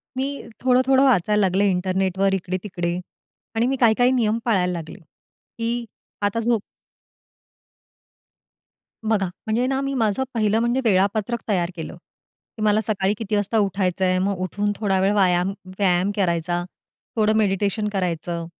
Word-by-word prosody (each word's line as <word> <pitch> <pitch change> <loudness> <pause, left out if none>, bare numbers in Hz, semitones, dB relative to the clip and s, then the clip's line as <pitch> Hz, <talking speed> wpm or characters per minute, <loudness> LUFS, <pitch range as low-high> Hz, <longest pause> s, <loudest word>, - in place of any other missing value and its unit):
मी 275 +2 -3 0.2
थोडं-थोडं 260 +1 +4
वाचायला 210 -5 +3
लागले 190 +1 +2
इंटरनेटवर 190 +1 0
इकडे-तिकडे 180 -2 -3 0.6
आणि 225 +1 +2
मी 270 - +1
काही-काही 245 +1 +4
नियम 230 -4 +1
पाळायला 185 -6 +2
लागले, 165 -2 -7
की 230 +8 -7 0.4
आता 205 +3 0
झोप 230 -1 +1 2.5
बघा, 200 -4 +2 0.2
म्हणजे 225 +3 +1
ना 270 0 0
मी 275 0 -2
माझं 230 -1 +1
पहिलं 215 -1 +2
म्हणजे 240 +3 +1
वेळापत्रक 205 +3 +1
तयार 180 -5 0
केलं, 165 0 -6
की 180 +4 -18
मला 215 +1 +3
सकाळी 200 -2 0
किती 215 -2 -2
वाजता 205 +2 0
उठायचंय 185 -2 +1
मग 195 +1 0
उठून 205 +3 -1
थोडा 195 -3 0
वेळ 195 +2 +3
वायाम 185 -1 +2 0.2
व्यायाम 185 -1 +2
करायचा, 175 -2 0 0.5
थोडं 215 -1 +2
मेडिटेशन 205 0 +1
करायचं, 170 -2 -2
205 Hz, 130 wpm, -22 LUFS, 185-225 Hz, 2.5 s, थोडं-थोडं